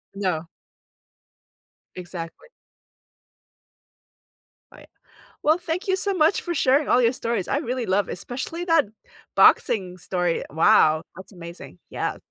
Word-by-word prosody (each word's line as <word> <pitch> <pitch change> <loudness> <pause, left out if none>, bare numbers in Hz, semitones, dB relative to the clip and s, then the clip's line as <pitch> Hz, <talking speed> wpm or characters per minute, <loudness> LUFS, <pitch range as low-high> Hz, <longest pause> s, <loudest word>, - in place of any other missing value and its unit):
No. 180 -5 -2 1.5
Exactly. 175 - -8 2.3
Right. - - -16 0.5
Well, 310 +2 +3
thank 360 +3 -4
you 380 - +2
so 395 +1 -1
much 330 0 +2
for 345 - -3
sharing 280 -1 +2
all 250 - +4
your 235 0 +4
stories, 230 -6 -2
I - - 0
really 255 -4 -3
love 195 +2 +1
especially 325 +8 -5
that 330 -6 +3 0.5
boxing 195 - +4
story. 180 -1 -1
Wow, 155 0 +4
that's 190 +3 -12
amazing, 170 - -11
yeah. - - -3
235 Hz, 115 wpm, -23 LUFS, -, 2.3 s, all